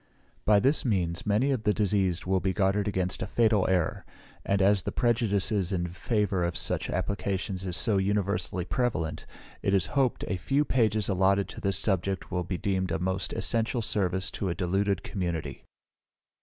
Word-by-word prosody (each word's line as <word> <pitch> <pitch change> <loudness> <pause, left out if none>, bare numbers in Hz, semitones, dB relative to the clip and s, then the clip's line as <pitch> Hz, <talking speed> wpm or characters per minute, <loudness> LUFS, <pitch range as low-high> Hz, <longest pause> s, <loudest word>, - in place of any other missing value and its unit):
By 105 -1 +5
this 135 +7 +2
means 90 -8 -1
many 110 +7 +2
of 130 -5 0
the 105 -1 +1
diseased 95 -4 0
will 95 0 +2
be 95 +1 -1
guarded 100 +1 +1
against 95 -2 -1
a 95 - -2
fatal 110 -2 +2
error: 90 -4 0 0.4
and 100 - +1
as 100 0 +4
the - - -4
prejudice 115 -4 +1
in 95 -3 0
favour 95 +1 -1
of 85 0 -1
such - - -1
applications 95 0 -2
is 90 -2 +1
so 100 +8 +4
universally 95 -2 0
prevalent, 90 -9 -2 0.3
it 100 - +1
is 95 - +2
hoped 135 -3 +1
a 95 - -1
few 140 +11 +1
pages 110 -6 +2
allotted 95 0 +2
to - - -9
this 100 -1 0
subject 95 -1 -1
will 90 0 -1
be 90 +1 -3
deemed 95 -1 -1
a - - +1
most 95 -1 -2
essential 115 +1 -1
service 95 -3 0
to 95 - -3
a 85 - -2
deluded 95 +2 0
community. 90 -5 -4
95 Hz, 175 wpm, -28 LUFS, 90-105 Hz, 0.4 s, By